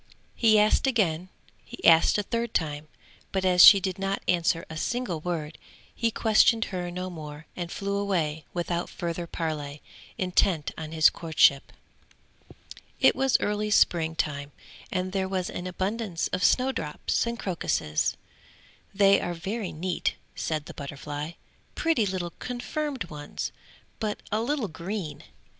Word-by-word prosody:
He 220 -2 +4
asked 210 +5 +4
again, 185 -8 +1 0.3
he - - -9
asked 165 +3 +6
a 205 - 0
third 230 +2 -3
time, 150 -2 -1 0.4
but 190 -1 -1
as 180 -1 +6
she 200 - +11
did 190 0 -3
not 195 0 -2
answer 170 -1 +1
a 160 - -8
single 230 0 -2
word, 160 -2 -4 0.3
he 230 - 0
questioned 225 +1 +4
her 180 -1 -3
no 180 +1 -5
more 150 -2 -8
and 175 -1 -5
flew 200 0 -2
away 165 -7 -1
without 175 0 -2
further 170 -1 -4
parley, 150 -4 -4 0.3
intent 180 -4 +1
on 155 -1 -7
his 160 -1 +5
courtship. 155 -4 +3 1.3
It - - +5
was 270 -1 +3
early 210 +1 -1
spring 165 -5 +3
time, 145 -2 -2 0.4
and 185 0 -1
there 190 -1 -1
was 185 -2 -2
an 180 - -5
abundance 190 0 -2
of 185 - -2
snow 260 +1 +4
drops 160 - -2
and 235 0 -3
crocuses. 165 - -1 0.8
"They 195 0 +5
are 175 - -3
very 195 +4 -4
neat," 175 +2 -2 0.2
said 155 -2 -3
the - - -9
butterfly, 145 +2 -6 0.4
"pretty 290 -11 +2
little 180 -2 -3
confirmed 255 +1 -3
ones, 145 -1 -5 0.5
but 215 -2 -3
a 215 +1 +1
little 260 -1 -1
green!" 170 0 -5
180 Hz, 145 wpm, -27 LUFS, 160-210 Hz, 1.3 s, she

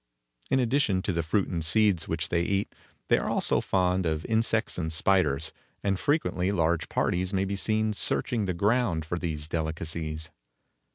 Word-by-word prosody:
In 130 - +3
addition 120 -7 +2
to 100 - -1
the 85 - 0
fruit 95 +5 0
and 85 -3 -3
seeds 90 0 +2
which 80 0 -2
they 85 - +1
eat, 100 +3 -1 0.3
they - - +4
are - - -2
also - - +1
fond 90 -1 +1
of 80 0 -2
insects 110 -2 +1
and 80 -2 -2
spiders, 80 -3 +2 0.3
and 100 -2 0
frequently 100 - +1
large 85 -3 +1
parties 90 +2 0
may 95 0 +1
be 100 +1 -2
seen 110 +2 +1
searching 110 +1 0
the 90 -2 -2
ground 100 -4 +1
for 90 +2 -3
these 75 -4 -3
delicacies. 80 0 -3
90 Hz, 170 wpm, -28 LUFS, 80-100 Hz, 0.3 s, they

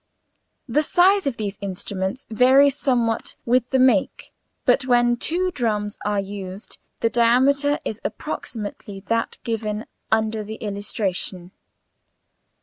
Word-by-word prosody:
The 270 +5 +2
size 370 +3 +4
of 265 - -2
these 205 -2 -4
instruments 190 +3 -3
varies 265 +4 +5
somewhat 240 -5 0
with 245 0 +2
the 265 - +2
make, 255 -6 +2 0.3
but 260 - +3
when 240 -1 +4
two 360 +8 -1
drums 210 -8 -2
are 205 -1 0
used 195 0 -7 0.2
the 230 - +3
diameter 275 +5 +3
is 215 - -4
approximately 205 -3 -5
that 230 +3 -1
given 220 -1 -3 0.3
under 220 0 +1
the 215 +1 -7
illustration. 200 -3 -3
230 Hz, 120 wpm, -22 LUFS, 205-260 Hz, 0.3 s, varies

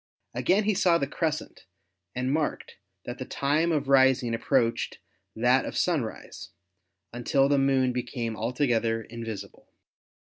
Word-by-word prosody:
Again 180 - +2
he 215 +1 +2
saw 180 -3 +3
the 140 - -1
crescent 155 - -4 0.5
and 130 +1 -1
marked 155 -1 -2 0.3
that - - -6
the - - -3
time 155 +5 0
of 150 -3 0
rising 130 -3 +4
approached 115 +1 0 0.4
that 125 +3 +3
of - - -5
sunrise, 150 -11 -2 0.6
until 135 +3 +2
the 140 0 +3
Moon 135 -2 +2
became 120 -2 -3
altogether 115 -1 0
invisible. 115 -2 -8
130 Hz, 125 wpm, -27 LUFS, 120-145 Hz, 0.6 s, rising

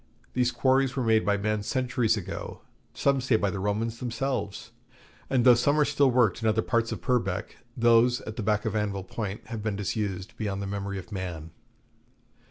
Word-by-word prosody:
These 125 -1 +2
quarries 130 +2 +2
were 130 - 0
made 110 -1 +3
by 100 0 +2
men 105 +1 -1
centuries 120 0 0
ago, 95 -1 -6 0.3
some 140 -1 +1
say 125 -2 +2
by 100 -3 +1
the 100 - -4
Romans 110 +4 -1
themselves; 125 -3 -3 0.6
and 130 -2 +2
though 125 - +9
some 145 +6 +2
are 150 - +5
still 140 -1 +3
worked 120 -5 +2
in 110 - 0
other 110 +1 +1
parts 115 -2 0
of - - -5
Purbeck, 125 -2 -1 0.2
those 120 +1 +4
at 110 - -7
the 115 - -3
back 105 0 0
of 110 -1 -1
Anvil 100 -2 -1
Point 100 +1 -5
have 115 -3 -4
been 105 -1 -2
disused 100 0 -3
beyond 100 -3 -2
the 100 - -3
memory 100 0 -4
of 90 -2 -9
man. 90 -5 -5
110 Hz, 190 wpm, -27 LUFS, 100-125 Hz, 0.6 s, though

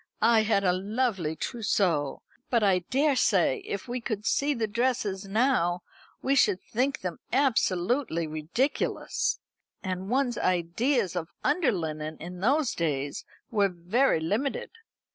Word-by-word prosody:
I 230 -1 +6
had 215 -2 +2
a 180 -2 +3
lovely 195 -4 -1
trousseau; 180 - 0 0.3
but 235 -3 +2
I 190 -3 +4
daresay 255 - +3
if 200 - -5
we 245 0 -3
could 215 -2 -3
see 285 +4 +2
the 230 -2 0
dresses 215 -3 -1
now 195 -6 +1 0.4
we 270 - +2
should 210 -8 +4
think 265 +7 -1
them 180 -3 -4
absolutely 230 - +1
ridiculous. 155 - -1 0.5
And 185 0 -3
one's 250 -1 +1
ideas 185 - +1
of 170 -2 -3
under 305 +1 +2
linen 155 -4 -4
in 180 +2 -8
those 270 - +2
days 145 -4 -2 0.3
were 205 -3 +3
very 180 +6 +1
limited. 210 - -2
205 Hz, 130 wpm, -28 LUFS, 175-250 Hz, 0.5 s, I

